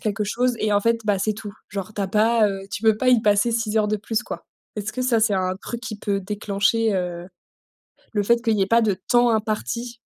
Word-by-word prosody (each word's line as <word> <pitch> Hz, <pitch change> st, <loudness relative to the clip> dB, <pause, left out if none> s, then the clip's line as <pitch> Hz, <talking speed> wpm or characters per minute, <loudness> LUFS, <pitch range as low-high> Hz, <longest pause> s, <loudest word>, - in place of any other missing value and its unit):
quelque 210 Hz, -1 st, -1 dB
chose 245 Hz, +4 st, 0 dB
et 215 Hz, -1 st, 0 dB
en 205 Hz, -, +3 dB
fait, 230 Hz, +2 st, +1 dB
bah, 205 Hz, -2 st, +1 dB
c'est 215 Hz, +3 st, 0 dB
tout. 205 Hz, -1 st, -8 dB, 0.2 s
Genre 200 Hz, +1 st, -5 dB
tu -, -, -4 dB
as 195 Hz, -, -2 dB
pas, 220 Hz, +1 st, +3 dB
heu, 195 Hz, -1 st, -5 dB
tu 205 Hz, -, -5 dB
peux 220 Hz, -1 st, +4 dB
pas 255 Hz, -, 0 dB
y 245 Hz, -3 st, +5 dB
passer 205 Hz, +2 st, +3 dB
6 225 Hz, -1 st, -1 dB
heures 210 Hz, -1 st, +2 dB
de 215 Hz, -, +1 dB
plus, 215 Hz, +2 st, -2 dB
quoi. -, -, -8 dB, 0.3 s
Est-ce 210 Hz, 0 st, -4 dB
que 255 Hz, -, -3 dB
ça 235 Hz, -3 st, +2 dB
c'est 215 Hz, -2 st, +3 dB
un 185 Hz, 0 st, 0 dB
truc 235 Hz, +4 st, -7 dB
qui 240 Hz, -4 st, -6 dB
peut 200 Hz, -1 st, -1 dB
déclencher, 205 Hz, +2 st, 0 dB
heu, 180 Hz, -1 st, -3 dB, 0.9 s
le 205 Hz, -1 st, +1 dB
fait 235 Hz, +3 st, +3 dB
qu'il 225 Hz, -3 st, +1 dB
y -, -, +1 dB
ait 190 Hz, -, +3 dB
pas 230 Hz, +3 st, +3 dB
de 205 Hz, -4 st, +1 dB
temps 240 Hz, 0 st, +5 dB
imparti? 225 Hz, +2 st, -2 dB
215 Hz, 250 wpm, -23 LUFS, 200-230 Hz, 0.9 s, y